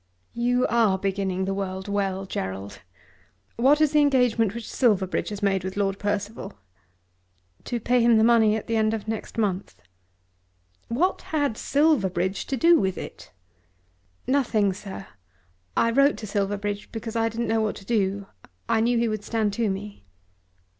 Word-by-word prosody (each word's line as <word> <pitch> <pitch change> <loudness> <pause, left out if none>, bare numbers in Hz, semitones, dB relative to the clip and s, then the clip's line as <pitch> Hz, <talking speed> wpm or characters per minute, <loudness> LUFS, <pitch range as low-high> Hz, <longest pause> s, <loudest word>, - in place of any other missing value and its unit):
"You 245 +1 +1
are 225 -5 +3
beginning 190 -1 -1
the 195 - -1
world 190 -1 -4
well, 195 -1 -1
Gerald! 95 - -5 0.7
What 270 +6 +4
is 310 -2 +3
the 300 -1 +4
engagement 245 -7 +2
which 235 - -6
Silverbridge 200 -7 +1
has 205 0 -6
made 195 -2 +1
with 190 +1 -5
Lord 195 -1 0
Percival?" 205 +1 -3 1.1
"To 240 - -2
pay 245 +2 +2
him 235 -1 +5
the 220 - +4
money 225 -2 +5
at 220 - -4
the 230 - -1
end 220 0 +2
of 215 -1 -7
next 220 +1 -5
month." 200 -3 -2 1.1
"What 345 +11 0
had 290 -7 +1
Silverbridge 195 - +1
to 270 - -2
do 335 +6 +5
with 190 -2 -1
it?" - - -9 0.9
"Nothing, 225 -7 +2
sir. 195 0 -8 0.7
I 230 - +3
wrote 275 +4 +4
to 220 - -7
Silverbridge 205 0 -2
because 225 0 -6
I 225 0 +1
didn't 230 +1 -3
know 225 0 +2
what 215 -1 -1
to 195 - -12
do. 200 -3 0 0.4
I 220 - +2
knew 240 +1 +2
he 235 0 +2
would 215 -2 -3
stand 215 -2 -1
to 225 0 0
me." 200 - -6
215 Hz, 160 wpm, -25 LUFS, 195-235 Hz, 1.1 s, him